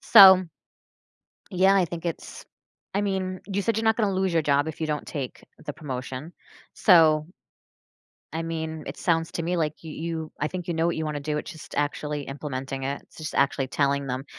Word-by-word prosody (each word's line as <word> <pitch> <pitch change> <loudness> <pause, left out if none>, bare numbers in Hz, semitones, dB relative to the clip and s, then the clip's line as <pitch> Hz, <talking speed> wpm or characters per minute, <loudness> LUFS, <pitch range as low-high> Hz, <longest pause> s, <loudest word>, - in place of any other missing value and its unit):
So 190 -4 +9 1.1
yeah, 190 +1 +4
I 185 -3 +4
think 170 +1 -7
it's 170 - -5 0.5
I 200 - +1
mean, 190 -2 -2
you 200 0 -1
said 225 +1 0
you're 225 - 0
not 220 0 +3
gonna 210 -4 +1
lose 190 -1 0
your 165 - +3
job 145 0 +2
if 160 - -6
you 160 - -1
don't 150 -1 -2
take 135 -5 -6 0.2
the 145 - -4
promotion, 135 0 -6 0.4
so 160 -5 +5 1.1
I 165 - -2
mean, 160 -1 -4
it - - -6
sounds 165 -2 +1
to 165 - -2
me 175 +2 0
like 155 -1 -2
you 160 - -7
you 160 0 -4
I 150 - +1
think 180 +1 -6
you 175 - -1
know 165 0 +1
what 170 - 0
you 160 - -2
wanna 150 -1 -2
do, 150 +1 -2
it's - - -5
just 160 - -11
actually 145 0 -1
implementing 135 -1 -5
it, 140 +1 -3
it's - - -22
just 155 -1 -5
actually 135 -1 +2
telling 140 0 0
them. 130 +1 -3
160 Hz, 205 wpm, -26 LUFS, 145-180 Hz, 1.1 s, So